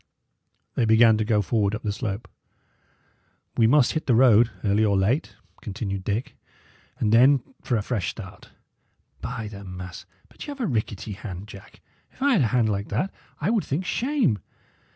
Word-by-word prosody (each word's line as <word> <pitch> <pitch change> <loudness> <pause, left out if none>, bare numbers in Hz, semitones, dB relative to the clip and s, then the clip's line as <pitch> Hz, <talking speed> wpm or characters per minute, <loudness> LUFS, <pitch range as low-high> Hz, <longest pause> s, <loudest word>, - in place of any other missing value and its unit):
They 120 - +1
began 110 0 +6
to - - +2
go 105 -1 +2
forward 105 0 +1
up 110 - -7
the 105 - -1
slope. 105 0 -4 1.3
"We 115 - +4
must 130 +1 +4
hit 155 - -3
the 125 - +4
road, 120 -2 +6
early 105 +1 +2
or 100 -2 +3
late," 115 +11 0 0.3
continued 100 -2 -4
Dick; 105 +6 -3 0.6
"and 105 0 +1
then 130 +2 +6 0.2
for 120 - 0
a 105 - -2
fresh 105 -5 -2
start. - - -10 0.7
By 115 -3 -4
the 100 -1 -9
mass! 90 -1 -8 0.2
but - - -11
y' 290 - -4
'ave 270 -3 -5
a - - +1
rickety 110 - -2
hand, 95 -1 -7
Jack. 100 -2 -13 0.3
If - - -24
I 280 +1 +3
had 200 - +4
a 120 - +3
hand 115 -1 +2
like 100 -1 -2
that, 145 - -1 0.3
I 170 +8 0
would 225 -4 +1
think 160 +7 -2
shame. 240 - +1
110 Hz, 180 wpm, -25 LUFS, 100-130 Hz, 1.3 s, began